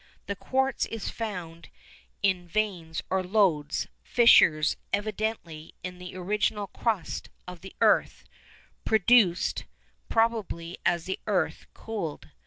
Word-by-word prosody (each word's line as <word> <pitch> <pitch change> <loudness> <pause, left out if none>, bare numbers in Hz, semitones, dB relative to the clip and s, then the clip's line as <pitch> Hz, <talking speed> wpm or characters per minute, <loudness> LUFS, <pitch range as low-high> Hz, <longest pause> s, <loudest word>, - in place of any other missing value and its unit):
The 200 - -3
quartz 265 +5 0
is 225 -2 -5
found 180 -7 -6 0.5
in 185 -3 +1
veins 175 -5 -2
or 190 0 +2
lodes, 180 -7 +1 0.2
fissures, 165 -10 +5 0.2
evidently, 205 -6 -3
in 180 0 -6
the 180 0 -9
original 205 +2 0
crust 205 -4 -2 0.2
of 180 -2 -9
the 190 - -11
earth, - - +3 0.6
produced 215 -4 +3 0.4
probably 220 -7 0
as 170 -1 +1
the 190 - -3
earth 185 -6 0
cooled. 200 -9 -5
190 Hz, 110 wpm, -27 LUFS, 170-215 Hz, 0.6 s, fissures